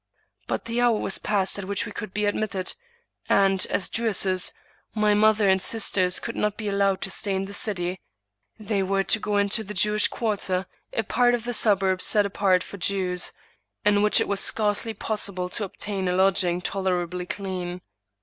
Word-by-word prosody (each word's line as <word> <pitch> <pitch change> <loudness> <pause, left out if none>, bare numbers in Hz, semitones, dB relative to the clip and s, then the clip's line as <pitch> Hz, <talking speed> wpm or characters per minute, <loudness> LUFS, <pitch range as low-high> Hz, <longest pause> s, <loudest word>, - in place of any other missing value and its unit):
But - - -3
the 230 +1 -1
hour 240 -2 +3
was 190 - -2
past 200 -1 0
at 195 - -5
which 200 0 -2
we - - -7
could 215 -4 -6
be 210 +2 -1
admitted, 205 -2 -2 0.6
and, 195 -1 +3
as 195 - 0
Jewesses,, 195 -5 0 0.4
my 210 -1 +3
mother 215 0 +3
and 190 0 +3
sisters 185 -4 +2
could 235 - -6
not 210 -1 -1
be 215 -1 -5
allowed 195 -1 +1
to 195 - -1
stay 200 -2 -1
in 190 0 -2
the 200 - -8
city; 185 -3 -1 0.6
they 210 -2 -2
were 195 +1 0
to 225 - +2
go 210 -1 -1
into 200 +2 +2
the 210 0 -8
Jewish 210 +2 +3
quarter, 195 -4 -2 0.3
a 225 - -1
part 245 +3 +2
of 235 - -6
the 245 0 -3
suburb 195 -4 +2
set 210 -1 +4
apart 190 -2 +1
for 200 - -10
Jews, 185 -1 +2 0.5
in 205 -1 +4
which 210 0 +4
it - - 0
was 200 -1 0
scarcely 215 +2 0
possible 200 -4 -3
to 205 +3 -2
obtain 195 0 -4
a 180 - +1
lodging 185 -2 +2
tolerably 180 -2 -2
clean. 180 -2 -4
200 Hz, 185 wpm, -25 LUFS, 185-210 Hz, 0.6 s, set